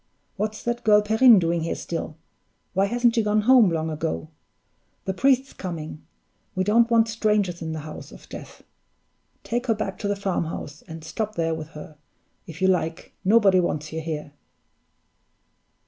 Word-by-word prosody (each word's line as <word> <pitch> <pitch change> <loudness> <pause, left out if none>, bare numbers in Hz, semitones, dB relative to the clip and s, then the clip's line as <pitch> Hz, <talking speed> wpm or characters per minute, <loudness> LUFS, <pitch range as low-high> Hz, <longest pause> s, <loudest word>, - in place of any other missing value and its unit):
What's 215 +1 -3
that 240 0 -2
girl 210 -1 +5
Perrine 220 +2 +6
doing 170 -1 +1
here 165 - -2
still? 165 -2 -5 0.6
Why 195 +1 +3
hasn't 240 +2 +2
she 230 - +2
gone 210 0 +2
home 240 -2 +6
long 160 -1 -1
ago? 80 - -3 0.8
The 190 - -1
priest's 265 +5 +2
coming; 160 -4 -6 0.5
we 185 - +1
don't 230 +4 +4
want 230 -1 +4
strangers 210 -5 0
in 160 -1 -4
the 155 - -4
house 155 +1 -9
of - - -14
death. - - -10 0.8
Take 240 +2 -2
her 225 - +3
back 195 -3 -4
to 205 - -2
the 205 - 0
farmhouse, 170 -6 -3
and 160 -1 -9
stop 215 +7 -4
there 165 -1 0
with 160 -1 -5
her, 150 0 -11 0.5
if 165 +3 -7
you - - +5
like; 175 -3 -1
nobody 195 -2 +5
wants 155 -3 -2
you 160 - -3
here!" 150 -2 -5
190 Hz, 165 wpm, -24 LUFS, 160-220 Hz, 0.8 s, Perrine